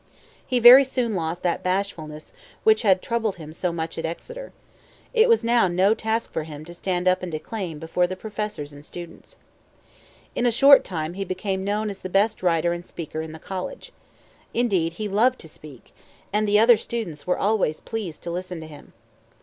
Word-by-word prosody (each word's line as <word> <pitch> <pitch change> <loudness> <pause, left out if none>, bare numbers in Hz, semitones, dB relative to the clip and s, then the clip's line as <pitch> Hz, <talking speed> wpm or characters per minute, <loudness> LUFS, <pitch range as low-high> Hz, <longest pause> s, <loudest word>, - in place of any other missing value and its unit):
He 255 - +1
very 245 +3 +10
soon 250 -4 -1
lost 170 -1 -3
that 175 -2 0
bashfulness 175 -5 -3 0.3
which 440 0 +5
had 190 -5 +3
troubled 225 -4 -1
him 155 -2 -10
so 175 +1 -2
much 165 -1 -4
at - - -4
Exeter. - - -7 0.6
It 465 0 +5
was 460 - +4
no 200 -4 +3
task 225 +1 -2
now - - -33
for - - -1
him 150 -1 -9
to 170 - -10
stand 180 0 -2
up 185 0 +3
and 180 -1 -5
declaim 170 +1 -5
before 165 +3 0
the 185 - -5
professors 210 -7 -5
and 145 0 -12
students. 170 +2 -10 1.0
In 245 - +1
a - - +3
short 275 +4 +7
time 160 -2 -4
he 195 +2 -3
became 190 +1 -3
known 210 +1 -1
as 195 - -10
the 185 - -5
best 205 +4 +2
writer 170 -1 +2
and 175 0 -6
speaker 160 -2 -6
in 160 0 -7
the 160 - -9
college. 185 - -6 0.6
Indeed, 190 -9 +1
he 210 +5 -4
loved 235 +6 +2
to - - -7
speak; 150 -5 -13 0.4
and 210 0 +1
the 205 0 +4
other 230 +2 +7
students 205 -13 -5
were 180 - +1
always 200 -7 +1
pleased 205 -9 -6
to 170 - -4
listen 180 0 -5
to 160 - -8
him. 150 -2 -14
185 Hz, 195 wpm, -24 LUFS, 165-220 Hz, 1.0 s, very